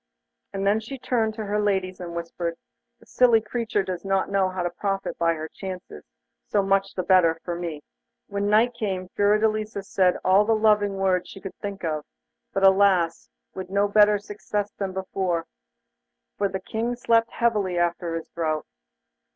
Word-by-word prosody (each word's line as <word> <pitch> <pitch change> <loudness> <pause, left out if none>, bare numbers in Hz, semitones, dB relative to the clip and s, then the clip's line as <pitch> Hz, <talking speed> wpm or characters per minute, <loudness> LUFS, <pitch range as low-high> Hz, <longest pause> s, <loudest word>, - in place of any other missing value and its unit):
And 195 0 -3
then 205 +2 +3
she 245 +5 -7
turned 225 -4 0
to 220 -1 -4
her 210 +1 0
ladies 190 -3 0
and 170 -2 -6
whispered 170 0 -4 0.4
'The - - -20
silly 240 -3 +4
creature 220 -1 -2
does 180 -2 -5
not 195 0 0
know 195 -1 +2
how 185 -1 -3
to 175 - -1
profit 195 +2 -2
by 165 0 +2
her 155 0 -5
chances; 185 +2 -8 0.4
so 205 -2 +2
much 195 0 +1
the 185 - -1
better 175 -3 +4
for 175 - -2
me.' 170 -4 -5 0.4
When 200 0 -2
night 225 +4 +4
came 185 -4 -3
Fiordelisa 215 0 +1
said 185 -2 +2
all 190 +2 +6
the 225 +1 +2
loving 210 -2 +3
words 185 -2 +1
she 195 - -10
could 195 0 -7
think 200 -2 -5
of, 155 -2 -2 0.5
but 195 - -1
alas! 190 -4 +4 0.2
with 185 -1 -6
no 200 +1 +2
better 210 0 +5
success 205 0 -4
than 195 -2 -4
before, 185 -3 -2 0.9
for 200 -1 0
the 190 - -3
King 225 +5 -3
slept 230 -1 +2
heavily 210 -6 +1
after 170 -1 0
his 165 - -5
draught. 155 -2 -2
195 Hz, 175 wpm, -25 LUFS, 180-210 Hz, 0.9 s, all